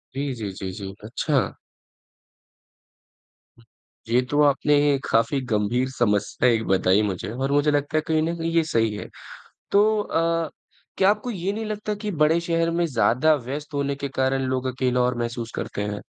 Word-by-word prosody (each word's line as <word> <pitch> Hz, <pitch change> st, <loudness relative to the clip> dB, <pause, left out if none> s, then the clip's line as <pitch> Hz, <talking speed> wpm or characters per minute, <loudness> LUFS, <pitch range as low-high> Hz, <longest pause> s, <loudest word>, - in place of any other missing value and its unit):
जी, 140 Hz, 0 st, -2 dB
जी, 105 Hz, -4 st, -5 dB
जी, 95 Hz, 0 st, -6 dB
जी। 95 Hz, 0 st, -7 dB
अच्छा। 130 Hz, +5 st, -1 dB, 2.5 s
ये 120 Hz, +2 st, +4 dB
तो 145 Hz, +1 st, +3 dB
आपने 145 Hz, +1 st, +3 dB, 0.3 s
काफ़ी 115 Hz, +5 st, +2 dB
गंभीर 110 Hz, +5 st, +1 dB
समस्या 120 Hz, -1 st, +1 dB
एक 115 Hz, -2 st, +2 dB
बताई 95 Hz, +1 st, +3 dB
मुझे 100 Hz, -2 st, -3 dB
और 135 Hz, +4 st, -2 dB
मुझे 145 Hz, +1 st, +3 dB
लगता 145 Hz, +1 st, 0 dB
है -, -, +3 dB
कहीं 160 Hz, -1 st, +2 dB
न 165 Hz, +2 st, -1 dB
कहीं 165 Hz, 0 st, -2 dB
ये 165 Hz, 0 st, +3 dB
सही 115 Hz, -8 st, +1 dB
है। -, -, -6 dB, 0.6 s
तो 215 Hz, +2 st, +4 dB
अ, 165 Hz, -3 st, 0 dB, 0.5 s
क्या 190 Hz, +1 st, +5 dB
आपको 210 Hz, +4 st, 0 dB
ये 190 Hz, -1 st, -2 dB
नहीं 220 Hz, +1 st, -4 dB
लगता 210 Hz, 0 st, -3 dB
कि 210 Hz, 0 st, -4 dB
बड़े 160 Hz, +2 st, +4 dB
शहर 165 Hz, 0 st, 0 dB
में 175 Hz, -, +2 dB
ज़्यादा 140 Hz, +2 st, +3 dB
व्यस्त 145 Hz, +3 st, -5 dB
होने 140 Hz, -1 st, -1 dB
के 140 Hz, 0 st, -4 dB
कारण 135 Hz, 0 st, 0 dB
लोग 130 Hz, 0 st, -1 dB
अकेला 125 Hz, -1 st, +1 dB
और 125 Hz, 0 st, +1 dB
महसूस 120 Hz, -1 st, -4 dB
करते 100 Hz, -, -4 dB
हैं? 105 Hz, 0 st, -3 dB
140 Hz, 170 wpm, -24 LUFS, 115-165 Hz, 2.5 s, क्या